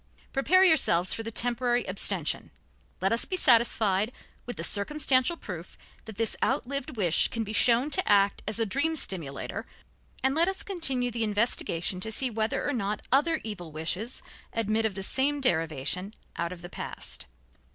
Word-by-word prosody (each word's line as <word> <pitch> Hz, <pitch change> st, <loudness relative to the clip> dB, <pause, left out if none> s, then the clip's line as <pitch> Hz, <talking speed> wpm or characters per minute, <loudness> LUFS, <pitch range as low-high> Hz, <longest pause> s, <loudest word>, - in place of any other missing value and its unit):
Prepare 340 Hz, +8 st, +4 dB
yourselves 185 Hz, -, +5 dB
for -, -, -3 dB
the 225 Hz, -, -5 dB
temporary 245 Hz, +1 st, +1 dB
abstention. -, -, -1 dB, 0.5 s
Let 195 Hz, -, +1 dB
us 230 Hz, -, +2 dB
be 370 Hz, -, -3 dB
satisfied 225 Hz, -, +3 dB, 0.4 s
with 245 Hz, -, -4 dB
the -, -, -4 dB
circumstantial 265 Hz, +7 st, +2 dB
proof 180 Hz, -, -8 dB, 0.3 s
that 220 Hz, -3 st, -10 dB
this 225 Hz, -1 st, 0 dB
outlived 270 Hz, -1 st, -1 dB
wish 175 Hz, -6 st, +3 dB
can 230 Hz, -, -3 dB
be 215 Hz, 0 st, -6 dB
shown 240 Hz, +6 st, +4 dB
to 370 Hz, -, +1 dB
act 200 Hz, -1 st, +4 dB
as 215 Hz, +2 st, +1 dB
a 225 Hz, -, +2 dB
dream 285 Hz, +9 st, 0 dB
stimulator 165 Hz, -, -2 dB, 0.6 s
and 265 Hz, 0 st, +3 dB
let 330 Hz, +4 st, +3 dB
us 385 Hz, 0 st, -2 dB
continue 270 Hz, -10 st, -2 dB
the 230 Hz, 0 st, -1 dB
investigation 205 Hz, -5 st, 0 dB
to 220 Hz, -, -1 dB
see 255 Hz, +3 st, 0 dB
whether 220 Hz, 0 st, -1 dB
or 290 Hz, -, 0 dB
not 210 Hz, -3 st, -3 dB
other 305 Hz, +5 st, +3 dB
evil 190 Hz, -7 st, -6 dB
wishes 175 Hz, +10 st, -3 dB, 0.3 s
admit 220 Hz, 0 st, +1 dB
of 205 Hz, -, -8 dB
the 195 Hz, -, -4 dB
same 280 Hz, +7 st, +1 dB
derivation 165 Hz, -, 0 dB, 0.2 s
out 170 Hz, +1 st, -2 dB
of 175 Hz, -1 st, -9 dB
the -, -, -6 dB
past. -, -, -5 dB
225 Hz, 170 wpm, -28 LUFS, 195-265 Hz, 0.6 s, yourselves